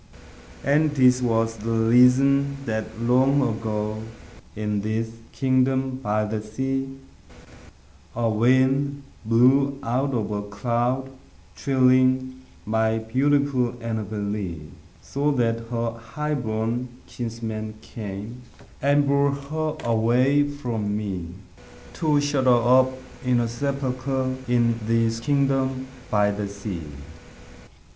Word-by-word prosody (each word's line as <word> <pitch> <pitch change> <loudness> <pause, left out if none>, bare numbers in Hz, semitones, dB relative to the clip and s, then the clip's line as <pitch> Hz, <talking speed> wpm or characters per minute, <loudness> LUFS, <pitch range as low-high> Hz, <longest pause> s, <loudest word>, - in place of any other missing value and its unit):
And 145 +2 +2
this 125 -2 +5
was 115 -1 +1
the 110 +2 -5
reason 125 +5 +4
that, 110 0 -4
long 130 +4 +3
ago, 110 -1 -3 0.5
In 105 -1 -2
this 110 +2 -2 0.2
kingdom 130 0 +1
by 105 -4 -1
the 105 0 -3
sea, 135 +5 -3 1.2
A 115 0 0
wind 130 +5 +2 0.2
blew 130 +5 +4
out 130 +3 0
of 110 -2 -2
a 105 -1 -2
cloud, 120 +6 -1 0.4
chilling 130 -1 +2 0.2
My 110 +1 +1
beautiful 130 +2 +1
Annabel 110 -2 -4
Lee; 95 -7 -4 0.3
So 145 +2 -1
that 115 -3 0
her 115 -1 -1
highborn 115 -1 -3 0.2
kinsman 110 -2 -5
came 105 +3 -7 0.4
And 145 +1 +3
bore 140 0 +2
her 155 +2 -3
away 125 +5 +3
from 115 -8 -3
me, 95 -5 -4 0.7
To 150 -3 +2
shut 145 -2 0
her 120 -2 +4
up 130 0 +3 0.3
in 125 -1 +2
a 120 - +1
sepulchre 130 +1 -2
In 120 -1 +2
this 115 0 +1
kingdom 135 -1 0 0.2
by 105 -1 +3
the 100 0 -3
sea. 100 -3 -6
120 Hz, 110 wpm, -24 LUFS, 110-135 Hz, 1.2 s, this